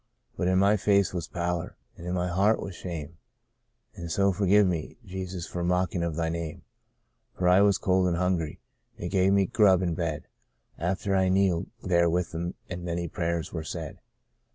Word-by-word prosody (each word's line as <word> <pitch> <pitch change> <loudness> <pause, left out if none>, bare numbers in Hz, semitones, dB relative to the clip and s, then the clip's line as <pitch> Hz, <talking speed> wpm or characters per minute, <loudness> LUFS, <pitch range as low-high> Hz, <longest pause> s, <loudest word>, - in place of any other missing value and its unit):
But 90 - -1
in 95 0 +3
my 100 +2 +4
face 100 -1 +2
was 85 -3 -3
pallor, 85 -1 -3 0.2
and 85 - -9
in 90 - -1
my 90 0 0
heart 100 +5 +2
was 95 - -6
shame 80 -3 -7 0.4
— - - -43
An' 85 -1 -7
so 100 +3 +2
fergive 100 +2 +4
me, 85 -4 -2
Jesus, 95 -2 -5
for 90 - -4
mockin' 90 0 0
of 85 -2 -2
Thy 85 0 0
Name; 80 -1 -4 0.7
For 90 - +1
I 90 +2 +6
was 100 -1 +4
cold 95 -1 +2
and 85 -1 0
hungry 90 -4 -1 0.2
— - - -42
they - - -4
gave 95 0 +3
me 100 -1 +4
grub 95 -2 +4
an' 85 -2 0
bed 80 -3 -2 0.6
After 95 +3 -1
I'd 95 -1 +3
kneeled 95 -3 +2 0.2
there 85 -2 +3
with 90 0 0
them, 85 +2 -4 0.2
ail' 90 - -3
many 85 0 -3
prayers 85 0 -2
were 80 -2 -3
said. 80 -1 -6
90 Hz, 195 wpm, -27 LUFS, 85-95 Hz, 0.7 s, I